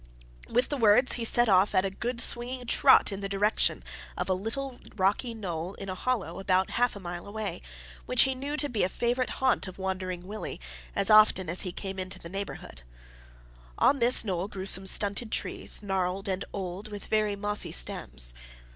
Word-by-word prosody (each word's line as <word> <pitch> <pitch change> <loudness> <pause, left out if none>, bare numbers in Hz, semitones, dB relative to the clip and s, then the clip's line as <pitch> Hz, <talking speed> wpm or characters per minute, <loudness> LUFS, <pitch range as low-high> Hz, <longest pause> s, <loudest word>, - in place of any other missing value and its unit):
With 245 +2 +1
the 290 - -2
words 230 +2 +4
he 235 - -2
set 240 +1 +3
off 190 0 +3
at 185 - +3
a 195 - -2
good 235 +5 -4
swinging 245 +1 +1
trot 265 0 +5
in 195 - -5
the 195 -1 -4
direction 200 - +1 0.3
of - - -3
a - - +3
little 245 +7 -3 0.2
rocky 210 +4 0
knoll 180 -3 -5
in 195 - -8
a - - -2
hollow 190 -4 -3
about 190 0 +1
half 245 -1 +1
a - - -7
mile 175 0 -7
away, 210 0 -5 0.5
which - - +5
he 265 - 0
knew 280 +3 -4
to 295 - +2
be 230 -6 -2
a 180 - +2
favourite 245 +4 -1
haunt 260 -5 0
of 185 - -9
Wandering 185 -2 -4
Willie, 210 +3 -6 0.4
as - - +1
often 215 -4 +5
as 180 - -2
he 180 - -3
came 195 +1 -6
into 185 0 -4
the 170 -2 -10
neighbourhood. 195 - -6 1.0
On 280 - +3
this 240 0 +6
knoll 185 -2 -2
grew 190 -2 -7
some 190 0 +2
stunted 205 +3 +3
trees, - - -1
gnarled 190 -1 -2
and 190 0 -2
old, 190 +1 -5
with 205 -1 -8
very 215 -1 0
mossy 205 +1 -3
stems. - - -1
200 Hz, 190 wpm, -28 LUFS, 185-235 Hz, 1.0 s, this